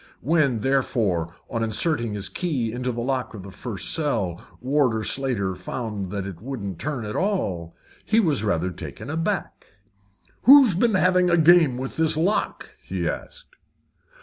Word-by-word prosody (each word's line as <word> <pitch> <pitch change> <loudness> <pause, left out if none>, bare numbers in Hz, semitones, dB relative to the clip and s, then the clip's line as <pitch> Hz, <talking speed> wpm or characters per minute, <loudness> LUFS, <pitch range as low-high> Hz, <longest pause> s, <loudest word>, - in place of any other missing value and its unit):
When, 140 -5 +2
therefore, 105 -11 0
on 115 - -3
inserting 115 +1 -1
his 100 -2 -4
key 125 - -2
into 125 +2 -2
the 120 0 -4
lock 130 -2 -2
of 100 - -8
the 100 - -9
first 105 0 -5
cell, 110 - -1 0.2
Warder 130 -4 +1
Slater 110 -4 -1
found 100 +1 -5
that 100 0 -4
it 95 -3 -8
wouldn't 105 -8 -5
turn 135 -4 -3
at 105 - -5
all, 95 - -1 0.3
he 225 - +2
was 150 - +1
rather 90 -3 0
taken 115 - -8
aback. 165 +5 -2 0.8
"Who's 265 -4 +9
been 215 +4 +2
having 185 -1 +3
a 170 - +4
game 165 -5 +5
with 130 +1 -5
this 160 -1 +3
lock?" 185 +7 0
he - - -3
asked. - - -7
125 Hz, 155 wpm, -24 LUFS, 105-160 Hz, 0.8 s, Who's